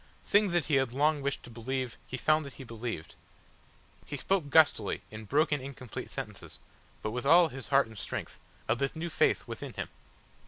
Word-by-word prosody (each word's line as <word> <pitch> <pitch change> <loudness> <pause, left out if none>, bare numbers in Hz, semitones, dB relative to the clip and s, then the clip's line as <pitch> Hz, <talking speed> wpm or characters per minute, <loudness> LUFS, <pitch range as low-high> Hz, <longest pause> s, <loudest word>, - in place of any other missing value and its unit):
Things 205 -2 +4
that 175 -3 +2
he 145 - +3
had 135 -3 +1
long 150 +2 +2
wished 140 0 -2
to 120 - -11
believe, 125 +2 -3
he 130 - -4
found 155 +3 +3
that 140 -2 -8
he - - -9
believed. 115 - -5 0.9
He 145 - -5
spoke 175 0 +1
gustily, 145 -10 +4
in 110 0 -8
broken 150 +3 +2
incomplete 130 -3 -7
sentences, - - -6 0.5
but 110 - -1
with 125 +4 -3
all 170 +2 +7
his 135 -2 -8
heart 140 0 +5
and 110 0 -13
strength, - - -5 0.3
of 115 +2 +1
this 140 +2 0
new 165 +2 -3
faith - - +2
within - - -6
him. - - -4
135 Hz, 190 wpm, -30 LUFS, 120-155 Hz, 0.9 s, all